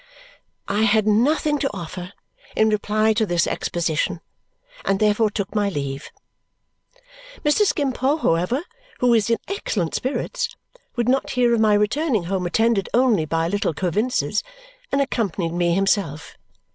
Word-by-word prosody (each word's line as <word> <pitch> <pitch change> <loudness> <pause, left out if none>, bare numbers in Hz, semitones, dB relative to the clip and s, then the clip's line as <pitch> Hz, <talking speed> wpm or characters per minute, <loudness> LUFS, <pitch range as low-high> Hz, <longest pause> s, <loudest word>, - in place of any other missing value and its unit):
I 205 +2 0
had 215 0 +3
nothing 290 +7 +2
to 275 - -1
offer 180 +2 -7 0.4
in 220 0 +4
reply 215 +1 +1
to 220 +1 +1
this 175 -4 +1
exposition 170 +1 -1 0.6
and 195 0 +1
therefore 215 +1 +3
took 200 -1 -4
my 205 -2 +1
leave. 140 -5 -4 1.4
Mr. 350 +8 +4
Skimpole, 280 -2 0
however, 180 - 0 0.3
who 250 - +2
was 230 -2 +3
in 230 - +3
excellent 210 - -2
spirits, 475 - -2 0.4
would 240 -1 0
not 265 +2 +1
hear 245 -1 +2
of 230 - +2
my 215 -1 +4
returning 220 - +1
home 180 0 -2
attended 220 +2 +1
only 235 -10 +3
by 165 +2 0
"Little 200 -4 -1
Coavinses," 210 - 0 0.5
and 280 - +2
accompanied 195 - -1
me 175 -1 +1
himself. 190 -6 0
210 Hz, 140 wpm, -22 LUFS, 180-245 Hz, 1.4 s, in